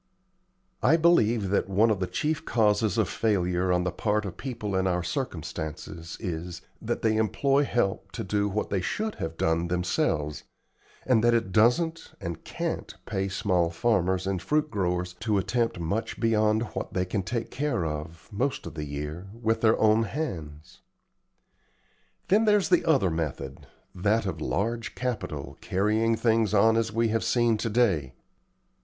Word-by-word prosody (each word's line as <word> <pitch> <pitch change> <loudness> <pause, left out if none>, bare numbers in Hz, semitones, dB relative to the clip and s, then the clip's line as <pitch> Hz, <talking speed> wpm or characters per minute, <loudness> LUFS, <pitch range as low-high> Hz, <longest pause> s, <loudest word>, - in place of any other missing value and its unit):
I 160 - +5
believe 120 - +3
that 100 0 +1
one 105 +4 +4
of 105 - 0
the 90 - -1
chief 150 - -1
causes 110 - +2
of 110 -4 +2
failure 90 -4 0
on 90 0 +2
the 90 - -1
part 105 +3 0
of 95 -2 -5
people 115 -7 -4
in 95 0 +1
our 90 -1 0
circumstances 85 - -5
is, 90 -3 -5 0.2
that - - -3
they 110 -1 +3
employ 135 +6 +2
help 100 -5 -1
to - - -4
do 100 +1 0
what 105 +2 -2
they 100 -2 +1
should 215 - -2
have 80 0 -4
done 80 +1 +1
themselves, 85 -4 -1 0.6
and 120 -4 +3
that 120 0 +5
it 105 -5 0
doesn't 140 - +2
and 85 -1 -6
can't - - -4
pay 95 -2 -2
small 90 -3 +1
farmers 95 -1 +1
and 95 -2 -1
fruit 150 0 0
growers 90 -3 -1
to 105 -2 +1
attempt 115 +2 0
much 95 +7 -2
beyond 110 -1 +2
what - - -5
they 90 -1 +1
can 95 +2 -1
take 115 +4 -3
care 135 - -1
of, 80 +1 -6
most 130 +7 -1
of - - -7
the 75 -2 -4
year, 75 +5 -5
with 115 -1 0
their 110 -1 +4
own 110 +1 +4
hands. 80 - -6 1.5
Then 215 +4 +4
there's 210 -6 +3
the 180 - +4
other 135 - +3
method 70 -4 -4 0.3
that 105 +4 +1
of 80 -5 -4
large 115 +7 -2
capital 115 - -4
carrying 110 +4 +1
things 110 -2 +2
on 110 +2 +5
as 115 -1 +1
we 115 +1 +1
have 115 +1 0
seen 120 -2 +2
to 115 +2 -2
day. 95 - +1
105 Hz, 165 wpm, -27 LUFS, 90-115 Hz, 1.5 s, I